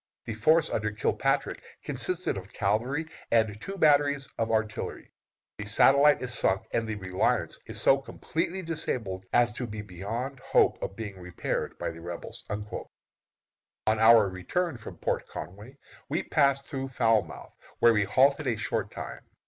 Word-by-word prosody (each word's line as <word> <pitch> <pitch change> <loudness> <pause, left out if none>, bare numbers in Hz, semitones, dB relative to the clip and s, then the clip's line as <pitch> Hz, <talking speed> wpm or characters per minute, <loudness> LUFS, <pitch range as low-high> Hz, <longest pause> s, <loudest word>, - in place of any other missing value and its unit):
The 115 - -4
force 155 +9 +3
under 110 0 0
Kilpatrick 105 0 0 0.2
consisted 185 0 -1
of 95 +1 -8
cavalry 120 +10 0 0.2
and 110 -2 +2
two 195 0 -6
batteries 145 -4 +3
of 115 0 0
artillery. 110 -1 -2 0.5
The 105 - -4
Satellite 140 +7 +5
is 125 -1 -2
sunk, 95 -5 +2
and 115 -1 0
the 110 - -2
Reliance 95 -2 -1
so 135 - +4
completely 170 +6 -3
disabled 110 - -3
as 120 0 +3
to 125 +2 -4
be 105 -1 -6
beyond 110 +8 -5
hope - - +2
of 95 - -4
being 105 -4 -7
repaired 90 -1 -3
by - - -3
the 85 0 -11
Rebels." 85 0 -7
On 105 +1 -6
our 110 -2 +7
return 120 - -2
from 110 - -9
Port - - -2
Conway 105 +9 -9 0.3
we 160 +4 0
passed 140 -2 +2
through 135 -1 -4
Falmouth, 115 -5 0 0.2
where 115 - +6
we 105 -2 +2
halted 135 +7 +3
a 115 -3 +1
short 105 - -2
time. - - -7
115 Hz, 150 wpm, -28 LUFS, 105-140 Hz, 0.5 s, our